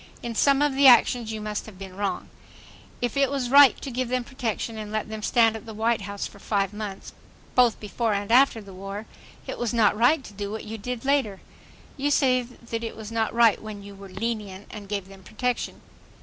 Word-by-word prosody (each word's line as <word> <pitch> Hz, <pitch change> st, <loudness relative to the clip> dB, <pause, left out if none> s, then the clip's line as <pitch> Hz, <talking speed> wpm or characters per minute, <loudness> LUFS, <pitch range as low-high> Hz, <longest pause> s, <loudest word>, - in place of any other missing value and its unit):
In 235 Hz, -1 st, -3 dB
some 275 Hz, +5 st, +3 dB
of 295 Hz, -2 st, +2 dB
the 275 Hz, +1 st, +6 dB
actions 240 Hz, -2 st, +5 dB
you 220 Hz, -, -4 dB
must 210 Hz, 0 st, -4 dB
have 210 Hz, -4 st, -12 dB
been 190 Hz, -1 st, -9 dB
wrong. 200 Hz, 0 st, -3 dB, 0.7 s
If 245 Hz, -, -1 dB
it 275 Hz, -1 st, +3 dB
was 265 Hz, -3 st, -2 dB
right 280 Hz, -1 st, +8 dB
to 270 Hz, -, -5 dB
give 250 Hz, 0 st, -2 dB
them 255 Hz, 0 st, 0 dB
protection 235 Hz, -3 st, -4 dB
and 210 Hz, -1 st, -6 dB
let 215 Hz, 0 st, -2 dB
them 220 Hz, 0 st, -6 dB
stand 225 Hz, 0 st, +3 dB
at 225 Hz, +1 st, -9 dB
the 220 Hz, -, -8 dB
White 225 Hz, 0 st, +1 dB
House 200 Hz, 0 st, -5 dB
for 200 Hz, -, -10 dB
five 200 Hz, -1 st, -1 dB
months, 210 Hz, -2 st, -7 dB, 0.4 s
both 245 Hz, -3 st, +4 dB
before 220 Hz, +2 st, -2 dB
and 200 Hz, +2 st, -3 dB
after 250 Hz, -2 st, +5 dB
the 200 Hz, -2 st, -12 dB
war, 195 Hz, +3 st, -7 dB, 0.4 s
it -, -, -6 dB
was 240 Hz, 0 st, -1 dB
not 220 Hz, -3 st, +4 dB
right 250 Hz, +7 st, +3 dB
to 210 Hz, -, -11 dB
do 200 Hz, 0 st, -5 dB
what 220 Hz, +1 st, -5 dB
you 220 Hz, +1 st, -7 dB
did 245 Hz, +3 st, -5 dB
later. 265 Hz, -9 st, +1 dB, 0.6 s
You 285 Hz, +1 st, 0 dB
say 260 Hz, -3 st, +3 dB
that 235 Hz, -1 st, -7 dB
it 225 Hz, -, -5 dB
was 220 Hz, 0 st, -8 dB
not 225 Hz, -1 st, 0 dB
right 230 Hz, -2 st, +4 dB
when 215 Hz, -2 st, -8 dB
you 200 Hz, 0 st, -10 dB
were 195 Hz, 0 st, -11 dB
"lenient" 205 Hz, -1 st, -4 dB
and 205 Hz, -2 st, -9 dB
gave 200 Hz, -2 st, -3 dB
them 195 Hz, 0 st, -14 dB
protection. 245 Hz, +5 st, -3 dB
220 Hz, 220 wpm, -25 LUFS, 205-245 Hz, 0.7 s, right